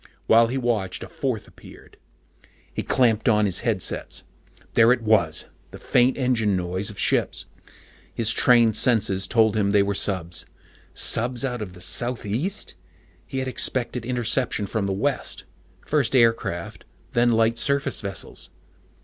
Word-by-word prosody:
While 115 +1 +5
he 130 +3 -3
watched, 110 -7 -2
a - - -8
fourth 125 -6 -4
appeared. - - -16 0.8
He - - -3
clamped 115 -3 +2
on 105 -1 +3
his 95 -3 0
headsets. - - -2 0.5
There 115 +1 +5
it 125 -2 +1
was! 95 -8 +2 0.2
The - - -11
faint 125 +1 +2
engine 120 -6 +1
noise 90 +3 -2
of 105 - -9
ships. - - +1 0.7
His 115 -1 0
trained 115 -3 +4
senses 100 -6 +1
told 110 -1 +2
him 100 -2 +1
they 100 0 +4
were 100 0 -1
subs. 90 -4 -2 0.5
Subs 125 +2 +4
out 125 -3 -3
of 95 -4 -6
the 90 - -14
southeast? 120 - -2 0.5
He 135 - -6
had 130 0 -2
expected 125 -1 0
interception 120 -2 0
from 100 0 -2
the - - -1
west 125 +8 -2 0.4
first 140 -4 0
aircraft, 115 -8 +1 0.3
then 120 0 +3
light 115 +1 +2
surface 140 -2 0
vessels. 100 -2 -5
115 Hz, 145 wpm, -23 LUFS, 100-125 Hz, 0.8 s, While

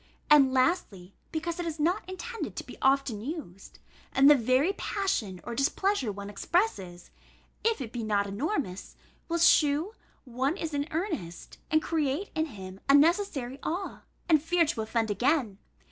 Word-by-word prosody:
And, 275 -3 +7
lastly, 255 - 0 0.2
because 335 +2 -3
it 350 - -2
is 320 -1 -5
not 350 +4 0
intended 445 +5 -6
to - - -5
be - - -10
often 270 -5 +2
used: 250 - -8 0.4
and 270 +1 +5
the 295 - +10
very 255 - +2
passion 245 - -2
or 235 - -5
displeasure 275 - 0
one 200 0 -7
expresses 200 - -2 0.5
(if 455 -4 +1
it 230 -4 -5
be 240 -2 -4
not 205 -2 +1
enormous) 200 - -3 0.3
will 340 - 0
shew 320 +2 +4 0.3
one 260 +7 -1
is 320 -2 -4
in 285 +1 -1
earnest, 315 - -5
and 310 0 +2
create 310 +3 -1
in 315 0 0
him 190 -6 -10
a 275 - +8
necessary 285 -5 +2
awe, 360 +5 -4 0.3
and 315 -4 +4
fear 335 +2 +2
to 255 -7 -2
offend 220 0 -1
again. 235 - +1
285 Hz, 160 wpm, -28 LUFS, 220-335 Hz, 0.5 s, the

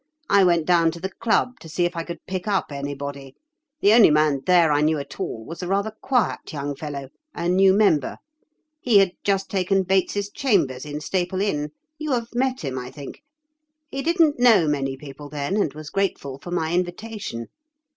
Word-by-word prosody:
I 200 - +6
went 170 -3 +3
down 170 -1 +4
to 170 - -9
the 190 +3 -4
club 235 +4 0
to 160 - -12
see 175 +3 0
if 175 0 -2
I 165 - -2
could 170 +1 -8
pick 185 +1 -4
up 195 -6 0
anybody. 140 -1 -6 0.5
The 205 - +5
only 230 -5 +8
man 150 -2 +2
there 175 -4 +5
I 145 0 +3
knew 155 +1 +2
at 140 -1 -8
all 110 0 -4
was 165 +7 -8
a 180 - -4
rather 200 +3 0
quiet 250 -6 0
young 145 -2 -4
fellow, 140 -2 -6 0.3
a 170 - -2
new 190 +2 +5
member. 190 -8 +2 0.6
He 235 -5 +4
had 195 -2 +5
just 195 -1 0
taken 190 0 +1
Bates's 195 +2 0
chambers 160 - 0
in 150 +1 -5
Staple 180 +4 -1
Inn—you 210 - -3
have 235 -1 -2
met 255 +1 0
him, 130 -4 -3
I 125 0 -7
think. 140 - -10 0.7
He 275 - -3
didn't 325 -3 +2
know 225 -9 +5
many 135 -2 -1
people 145 +1 -10
then 145 +5 -3
and 205 -8 +1
was 155 -1 -9
grateful 140 -9 -2
for 175 - -10
my 165 -2 -1
invitation. 180 - -3
175 Hz, 190 wpm, -23 LUFS, 145-200 Hz, 0.7 s, only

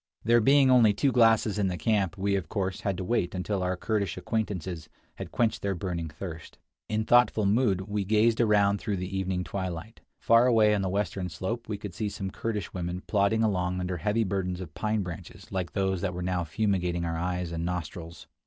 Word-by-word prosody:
There 120 +1 +4
being 135 +2 +5
only 115 -5 +6
two 135 +6 +1
glasses 115 -3 +3
in 100 - +2
the 90 -1 -2
camp, 100 +1 0
we 100 +1 0
of 95 -6 -3
course 95 -3 -2
had 100 -3 -1
to 95 - -3
wait 90 -2 0
until 95 +2 -2
our 90 0 -1
Kurdish 100 -1 -1
acquaintances 95 -7 -3 0.3
had - - -7
quenched 115 -2 0
their 100 -1 -1
burning 85 -2 -3
thirst. 80 +1 -8 0.3
In 110 0 0
thoughtful 120 -3 +4
mood 100 -2 +2
we 100 +1 -2
gazed 110 +3 +3
around 100 -2 +3
through 105 -4 -2
the 90 +2 -4
evening 95 -1 -1
twilight. 95 +3 -5 0.2
Far 115 +2 +5
away 110 -3 +5
on 105 - +1
the 95 - -1
western 95 -1 -2
slope 95 +10 -4
we 105 - -2
could 100 -3 -7
see 105 +2 -2
some 95 -1 -5
Kurdish 105 -4 -4
women 90 0 -4
plodding 105 +2 +2
along 90 -4 0
under 90 0 -2
heavy 105 +6 +1
burdens 90 -2 -2
of 85 -5 -8
pine 110 -1 -1
branches 85 -3 -9
like 90 -2 -3
those 95 -2 0
that 90 -2 -2
were 90 - -4
now 90 -1 -1
fumigating 90 -1 0
our 80 -1 -2
eyes 90 0 -2
and 85 0 -3
nostrils. 85 -1 -5
95 Hz, 205 wpm, -28 LUFS, 90-110 Hz, 0.3 s, only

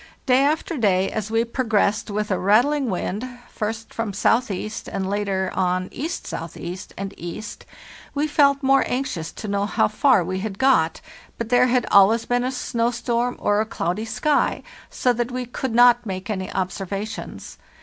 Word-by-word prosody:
"Day 260 +1 +4
after 310 +2 0
day, 195 -5 +2
as 215 -1 -3
we 225 +1 +1
progressed 220 -4 0
with 210 0 -2
a 185 - +1
rattling 245 +8 +3
wind, 195 +3 -2 0.3
first 220 +1 -4
from 225 -1 -2
S.E. 215 -3 +1 0.2
and 190 -1 -2
later 195 -2 -1
on 185 0 0
E.S.E. 175 - -5 0.2
and 195 0 -5
E., 175 +5 -6 0.7
we 290 +1 +1
felt 285 -2 +3
more 270 +1 +4
anxious 245 -11 -3
to 215 - -7
know 200 0 0
how - - +2
far 215 -1 +3
we 185 +2 -3
had 200 -1 -4
got; 225 -12 +3 0.4
but 230 -1 -4
there 250 +1 +5
had 250 -1 +2
always 210 +4 +5
been 245 0 +1
a 255 - -1
snow 235 -2 -1
storm 240 +1 -1
or 205 +1 +2
a - - -1
cloudy 180 +3 -2
sky, 290 +6 0 0.3
so 250 - +1
that 240 0 -2
we 250 0 -3
could 245 0 -4
not 245 0 +6
make 190 +2 -4
any 190 -2 -3
observations. 195 +3 -5
220 Hz, 170 wpm, -23 LUFS, 195-250 Hz, 0.7 s, not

